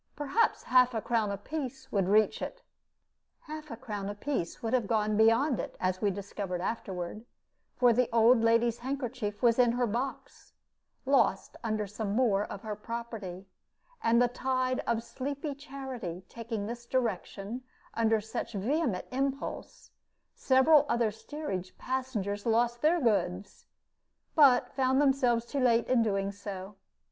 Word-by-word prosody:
Perhaps 295 +11 +1
half 250 -1 +4
a - - +1
crown 225 -3 +1
apiece 265 +5 -5
would 195 -3 +1
reach 215 +1 +3
it." - - -6 0.8
Half 305 0 -8
a 230 - -6
crown 205 -3 -5
apiece 205 -3 -3
would 225 +1 -1
have 245 -5 +2
gone 215 -1 +1
beyond 230 +5 +4
it, - - -5
as 185 0 -1
we 205 - +3
discovered 195 -1 -4
afterward, 190 0 -4 0.5
for 245 -2 +5
the 250 +1 +2
old 230 +1 +5
lady's 230 +1 +3
handkerchief 250 -4 -4
was 235 0 +4
in 240 -2 +5
her 245 0 +1
box, 240 +5 -5 0.5
lost 275 +1 +2
under 215 -2 -1
some 205 0 -4
more 215 -5 +3
of 195 - -8
her 215 -1 -4
property; 210 -4 -6 0.6
and 230 +1 +4
the 245 - +5
tide 255 +1 -1
of 230 0 0
sleepy 280 +4 -4
charity 265 - -7
taking 225 -3 -5
this 235 +2 -7
direction 235 -2 -2 0.3
under 225 -1 +2
such 220 +2 -5
vehement 225 - 0
impulse, 270 +1 -4 0.4
several 275 +3 +5
other 235 -2 +2
steerage 205 - -6
passengers 235 -6 -3
lost 235 +1 +2
their 330 +3 +4
goods, 195 - -1 0.7
but 270 -5 +5
found 265 0 +2
themselves 260 -5 +3
too 280 +3 -3
late 235 -2 +3
in 255 -2 +3
doing 195 -3 0
so. 200 -1 -7
235 Hz, 145 wpm, -30 LUFS, 205-260 Hz, 0.8 s, for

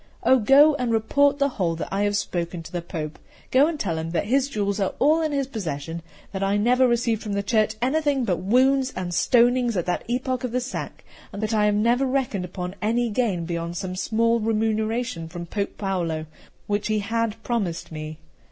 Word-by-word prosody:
Oh, 260 - +5
go 280 +7 +6
and 250 -3 -1
report 280 +6 +3
the 280 0 +2
whole 180 -11 -1
that 160 - -5
I 195 - 0
have 205 0 +1
spoken 170 -3 -3
to - - -11
the 175 - -3
Pope; 160 -3 -6 0.3
go 270 +3 +5
and 325 -2 -3
tell 165 -8 -1
him 160 +1 -4
that 175 - 0
his 265 +5 +1
jewels 200 -4 -1
are 195 -2 0
all 310 +4 +3
in 310 -1 0
his 280 -1 0
possession; 165 - -5 0.3
that 195 -1 -4
I 195 +1 +1
never 250 +4 +4
received 235 -2 +1
from 210 -2 -4
the 200 0 -1
Church 215 0 +1
anything 280 -1 +1
but 180 -5 0
wounds 260 +6 +2
and 180 -1 -4
stonings 240 +3 +3
at 175 - -1
that 180 - -1
epoch 255 +1 -1
of 250 -2 -3
the 250 - +2
sack; 255 +1 -6 0.3
that 215 +2 -3
I 210 -1 +3
never 235 +6 +2
reckoned 255 -8 -1
upon 180 0 -5
any 230 +2 +1
gain 205 -7 0
beyond 170 0 -4
some 185 -1 -4
small 230 +4 +1
remuneration 220 -3 -1
from 170 +1 -7
Pope 200 +3 -4
Paolo, 170 -6 -2 0.4
which 205 0 -1
he 215 -1 +1
had 225 +1 -1
promised 200 -11 -2
me. 155 0 -6
215 Hz, 200 wpm, -24 LUFS, 180-250 Hz, 0.4 s, go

